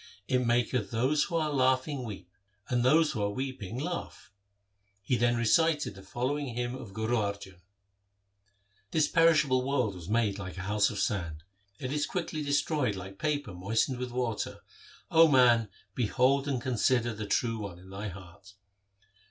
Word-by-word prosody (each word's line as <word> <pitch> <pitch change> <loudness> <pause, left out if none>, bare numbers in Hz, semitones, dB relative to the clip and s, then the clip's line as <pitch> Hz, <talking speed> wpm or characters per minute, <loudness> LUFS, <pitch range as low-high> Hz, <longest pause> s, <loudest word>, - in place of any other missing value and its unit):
It 130 -1 +2
maketh 120 -3 +1
those 130 +6 +2
who 170 - -5
are 155 -2 0
laughing 130 +1 +1
weep, 95 -6 -8 0.4
and 120 -1 +1
those 155 +5 +4
who 110 - -3
are 100 - +1
weeping 120 -2 -5
laugh.' 170 - -5 0.7
He 125 - +1
then 120 +1 +2
recited 150 +4 +2
the 95 - -12
following 125 +6 -3
hymn 120 0 -2
of 125 -6 -8
Guru 110 +2 0
Arjan: 100 -3 -4 0.7
— 100 0 -41
This 155 -2 +3
perishable 150 -6 +4
world 125 -6 0
was 90 -1 -9
made 105 -3 +1
like 95 -1 -7
a - - -4
house 105 +1 +2
of 105 - -6
sand; 85 -9 -2 0.3
It 130 +4 -4
is 145 -1 0
quickly 170 -4 -3
destroyed 145 -5 0
like 95 +1 -9
paper 145 -8 -1
moistened 110 +8 0
with 125 0 -3
water, 120 -3 -3 0.5
0 165 0 +8
man, 125 -5 +6
1 110 -2 -7 0.2
behold 130 +5 +2
and 135 -3 0
consider 120 -1 +1
the 105 -1 -6
True 115 +1 0
One 100 -4 -6
in 95 +1 -14
thy 100 +2 -5
heart. 95 +1 -12
120 Hz, 170 wpm, -29 LUFS, 100-135 Hz, 0.7 s, 0